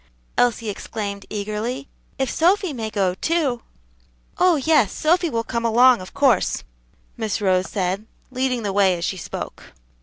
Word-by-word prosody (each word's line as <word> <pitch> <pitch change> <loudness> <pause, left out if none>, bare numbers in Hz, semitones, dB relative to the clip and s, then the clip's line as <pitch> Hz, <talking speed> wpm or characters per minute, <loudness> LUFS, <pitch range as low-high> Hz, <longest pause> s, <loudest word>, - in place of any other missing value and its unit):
Elsie 230 -2 +1
exclaimed 200 -1 -5
eagerly; 215 +6 -3 0.3
"if 265 - 0
Sophy 360 +2 +2
may 225 -4 -4
go, 195 -4 0
too." 280 - 0 0.8
"Oh, 360 -2 +5
yes, 285 -7 +3
Sophy 340 +2 +2
will 230 -4 -1
come 235 0 -3
along, 240 0 +5
of 185 - -9
course," 260 -9 +2 0.5
Miss 220 -2 -2
Rose 185 -2 +1
said, 195 +2 -2 0.2
leading 255 -2 -1
the 200 -2 -2
way 190 -3 +3
as 170 - -3
she 190 - -2
spoke. - - -7
230 Hz, 150 wpm, -22 LUFS, 200-265 Hz, 0.8 s, Oh